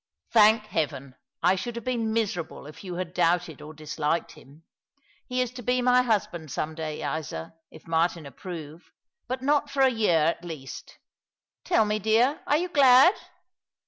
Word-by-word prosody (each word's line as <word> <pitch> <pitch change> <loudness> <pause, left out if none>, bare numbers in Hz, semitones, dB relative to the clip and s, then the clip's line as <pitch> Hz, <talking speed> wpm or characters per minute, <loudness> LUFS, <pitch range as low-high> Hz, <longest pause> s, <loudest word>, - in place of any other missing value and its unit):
"Thank 215 -1 +6
Heaven! 145 -8 -3 0.3
I 180 +2 +5
should 240 +5 -5
have 235 - -7
been 235 -3 -1
miserable 200 -10 -2
if 150 +6 -12
you 180 -2 -6
had 180 -1 -5
doubted 170 -3 0
or 150 - -9
disliked 155 +1 -2
him. 145 +4 -17 0.6
He 255 0 -1
is 250 -2 -2
to 250 0 -9
be 250 +2 +1
my 250 0 +4
husband 195 -9 -1
some 155 +4 -3
day, 155 -1 -5
Isa, 130 - -7 0.2
if 160 - -15
JMartin 165 0 0
approve 160 +1 -9 0.2
— - - -57
but 255 +1 -3
not 290 +1 +2
for 275 -1 +1
a 265 - +5
year, 215 -8 +2 0.2
at - - -23
least. 155 -6 -9 0.7
Tiill 225 -12 +3
me, 210 0 -1
dear, 225 +7 +2
are 295 - +3
you 360 +3 -2
glad 275 +1 +6
195 Hz, 175 wpm, -26 LUFS, 160-250 Hz, 0.7 s, Thank